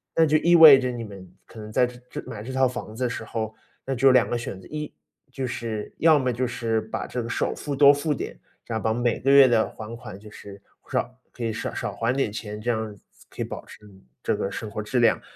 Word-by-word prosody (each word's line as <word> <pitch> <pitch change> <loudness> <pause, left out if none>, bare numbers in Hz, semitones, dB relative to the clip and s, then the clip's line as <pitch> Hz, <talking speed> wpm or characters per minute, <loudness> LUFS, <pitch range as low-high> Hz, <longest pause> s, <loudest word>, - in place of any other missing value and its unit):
那 165 - +5
就 155 0 +3
意 170 +3 +4
味 155 -5 +10
着 130 -1 -1
你 120 -1 -5
们 100 -4 -10 0.2
可 115 - -13
能 105 0 -8
在 125 - +3
这 125 0 -9
这 - - -6
买 105 - -7
这 125 +5 -7
套 130 0 +3
房 120 -3 -7
子 130 - -3
的 125 - +1
时 120 - -5
候， 110 -1 -4 0.3
那 135 - -2
只 135 +1 -1
有 135 - +9
两 125 -2 +4
个 120 - 0
选 115 -5 -6
择， 95 - -15
一， 150 -1 -5 0.4
就 130 0 -4
是 115 -3 -5
要 160 -1 +5
么 130 -3 0
就 125 +2 -1
是 115 -2 -1
把 110 - -5
这 125 - -4
个 115 - -6
首 - - -1
付 145 -1 -4
多 140 +1 +7
付 145 +2 -1
点， - - -6 0.3
然 110 -1 -3
后 - - -9
把 110 - +1
每 120 0 0
个 135 - 0
月 140 -1 +8
的 115 -3 +3
还 110 +1 -8
款 105 -4 -10
就 105 +1 -13
是， 100 -1 -12 0.3
少 - - 0 0.2
可 120 - -8
以 115 -1 -1
少 110 - -4
少 - - -4
还 115 +2 0
点 135 -6 0
钱， 105 -1 -6
这 120 +3 0
样 110 -2 -3 0.3
可 - - -8
以 - - 0
保 - - -7
持 - - -14 0.4
这 - - +1
个 - - -2
生 105 0 -6
活 105 0 -4
质 125 +4 -1
量。 115 -2 +3
120 Hz, 285 characters per minute, -25 LUFS, 110-130 Hz, 0.4 s, 味